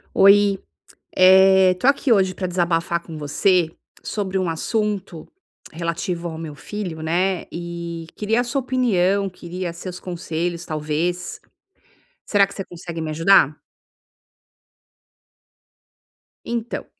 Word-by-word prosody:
Oi, 200 0 +6 0.6
eh, 190 0 +6
tô 180 - -2
aqui 275 -2 +3
hoje 190 -3 +3
pra 185 -1 -3
desabafar 170 -1 0
com 165 -2 -10
você 165 +3 +2 0.3
sobre 195 -3 -3
um 185 -2 0
assunto 200 -1 -2 0.5
relativo 170 +1 -3
ao 160 - -6
meu 160 -2 -7
filho, 180 -3 -6
né. 175 +4 0
E 170 -1 -6
queria 220 +3 +1
a - - -1
sua 275 +3 -1
opinião, 200 -7 +1
queria 180 0 -6
seus 180 +1 -8
conselhos, 175 -1 -4
talvez. 155 +4 -2 0.8
Será 200 -2 +3
que 200 - -12
você 195 - -5
consegue 170 -1 -8
me 160 -1 -3
ajudar? 155 -2 +4 2.9
Então, 235 0 -4
180 Hz, 115 wpm, -22 LUFS, 170-195 Hz, 2.9 s, Oi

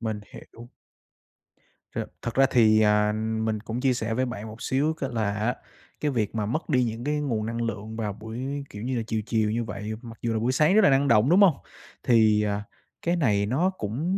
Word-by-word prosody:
Mình 110 -2 -3
hiểu. 120 +1 -12 1.3
Ch - - -5 0.2
thật 120 - -4
ra 135 0 +6
thì, 110 -3 +5
à, 105 0 +3 0.3
mình 110 -1 -1
cũng 115 +3 -5
chia 130 -2 +3
sẻ 110 -2 -2
với 130 +2 0
bạn 110 -3 -6
một 110 +1 -10
xíu 145 +4 +1
cái 140 -4 -4
là 105 -3 0
á, 110 +4 -1 0.4
cái 150 -1 0
việc 110 -3 -1
mà 105 -2 -1
mất 155 +10 -3
đi 125 -3 +3
những 115 +1 -3
cái 150 +1 0
nguồn 115 -7 -1
năng 115 +1 -3
lượng 110 -1 -4
vào 105 -3 -2
buổi, 125 +7 -5
kiểu 105 +2 -8
như 130 0 -2
là, 115 - -1
chiều 110 -1 -1
chiều 110 -2 +1
như 115 +1 -1
vậy, 105 0 -5
mặc 115 -2 -10
dù 115 -1 -1
là 110 - 0
buổi 120 +3 +1
sáng 155 +7 +3
rất 220 - +7
là - - +6
năng 140 +1 +3
động, 115 +3 +4
đúng 185 +4 +5
hông? 180 -8 +6 0.5
Thì, 110 -3 +4
à, 105 0 -1 0.4
cái 170 +1 +1
này 105 -11 +2
nó 150 - +1
cũng 150 - -2
115 Hz, 230 wpm, -26 LUFS, 110-135 Hz, 1.3 s, rất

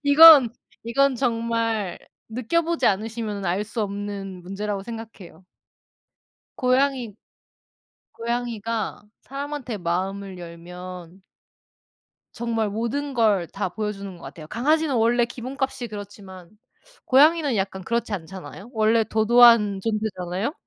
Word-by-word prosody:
이건, 285 -4 +9 0.3
이건 265 +3 +2
정말 230 -5 -1 0.3
느껴보지 325 +9 0
않으시면은 215 0 -1
알 190 +4 0
수 220 +1 -3
없는 200 -2 -5
문제라고 195 +2 -4
생각해요. 225 -5 -10 1.1
고양이 255 -3 +1 1.0
고양이가 230 -2 -3 0.2
사람한테 275 -4 -5
마음을 190 +2 -3
열면 180 +1 -10 1.1
정말 225 -2 -1
모든 235 +7 -3
걸 210 -7 +2
다 195 +1 -3
보여주는 200 -2 -5
것 170 - -16
같아요. 155 -2 -10
강아지는 295 - +1
원래 235 +1 +3
기본값이 255 +1 -4
그렇지만 200 -4 -10 0.6
고양이는 290 0 +4
약간 190 -1 -2
그렇지 235 +2 -2
않잖아요. 190 +4 -8
원래 220 0 +3
도도한 220 -2 +5
존재잖아요? 210 - -2
220 Hz, 275 characters per minute, -24 LUFS, 195-240 Hz, 1.1 s, 이건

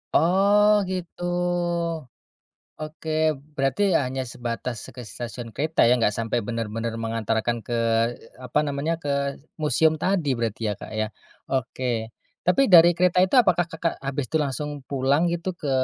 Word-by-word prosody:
Oh 200 +4 +4
gitu. 180 -2 -5 1.6
Oke 155 +1 -7 0.5
berarti 135 +6 0 0.2
hanya 130 +1 -3
sebatas 120 +1 -4
se - - -10
ke 125 - -7
stasiun 120 0 -6
kereta 155 +3 0
ya, 125 - +6
enggak 110 -3 +2
sampai 115 +1 -1
benar-benar 115 0 -3
mengantarkan 115 +1 -1
ke, 120 - -4
eee, 115 0 0
apa 125 +5 +1
namanya, 145 +4 -1
ke 145 - -3 0.5
museum 155 +1 +3
tadi 185 -6 +1
berarti 115 -1 -3
ya, - - 0
Kak, - - -9
ya. - - +1 0.4
Oke, 130 -1 -2 0.6
tapi 180 +10 +4
dari 170 0 +10
kereta 180 0 +2
itu 190 - -1
apakah 175 -5 +2
Kakak 165 +1 -1
habis 135 0 -2
tuh 160 - +3
langsung 140 +2 -3 0.2
pulang 140 +3 +2
gitu 170 +2 -3
ke 145 - -2
140 Hz, 150 wpm, -24 LUFS, 120-165 Hz, 1.6 s, dari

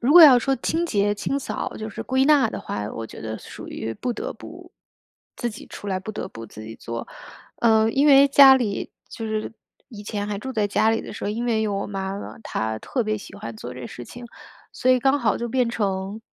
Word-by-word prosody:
如 255 +5 +3
果 350 -1 +11
要 270 -5 +10
说 270 +3 +1
清 330 +7 -1
洁、 205 -5 +1
清 275 +7 -2
扫， 275 - -4
就 220 0 -5
是 - - -6
归 260 +1 +2
纳 290 -2 +5
的 - - -5
话， 105 0 -4
我 115 0 -6
觉 - - -11
得 110 0 -5
属 - - -10
于 115 - -4
不 250 -1 -3
得 - - -5
不 - - -12 0.6
自 240 - -2
己 215 - -11
出 205 - -10
来， 190 -1 0
不 205 +3 -6
得 - - -5
不 115 0 -9
自 110 +1 -11
己 110 +1 -8
做。 115 0 -6 0.5
嗯， 220 -1 +3
因 280 +2 +4
为 275 -1 +8
家 275 -1 +9
里 230 -6 -1 0.2
就 225 - -5
是 215 0 -3 0.4
以 210 -4 -10
前 205 -1 -3
还 205 -1 -3
住 265 +6 -6
在 215 -4 +1
家 210 +2 +2
里 225 - +1
的 - - -8
时 - - -6
候， - - -1
因 230 +3 -3
为 225 -2 +1
有 210 -2 0
我 195 - -2
妈 195 0 -4
妈， - - -8
她 110 - -2
特 245 - -2
别 215 0 -1
喜 - - -11
欢 115 0 -7
做 120 +3 -8
这 125 -1 -7
事 120 - -9
情， 245 - -10 0.5
所 255 - +1
以 255 - +5
刚 270 +3 +3
好 225 -5 +1
就 235 - -3
变 250 -1 +1
成 200 -1 -2
215 Hz, 260 characters per minute, -23 LUFS, 195-250 Hz, 0.6 s, 果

